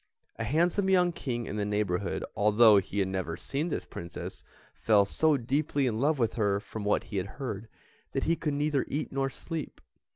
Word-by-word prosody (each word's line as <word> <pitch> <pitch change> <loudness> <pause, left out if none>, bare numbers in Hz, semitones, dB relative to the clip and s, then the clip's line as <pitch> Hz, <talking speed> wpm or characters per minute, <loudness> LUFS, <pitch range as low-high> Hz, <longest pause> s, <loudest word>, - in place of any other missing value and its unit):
A 115 - -2
handsome 170 - +2
young 180 -2 +4
King 120 -7 -3
in 105 - -4
the 105 - 0
neighbourhood, 100 -2 -1
although 105 +1 +6
he 100 - -6
had 100 -2 +2
never 95 -3 -3
seen 140 - -2
this - - -3
Princess, 85 0 -7 0.3
fell 105 -3 +3
so 155 +8 +2
deeply 140 +3 0
in 115 -3 0
love 150 +2 +3
with 115 -3 +1
her 100 -3 +1
from 110 +1 -7
what 105 - +1
he 105 - -5
had 95 - -1
heard, 115 -6 -4 0.5
that - - 0
he 165 - +2
could 150 -2 -2
neither 145 -1 +1
eat 145 - -3
nor 135 0 0
sleep. 160 +2 -6
120 Hz, 195 wpm, -29 LUFS, 105-150 Hz, 0.5 s, although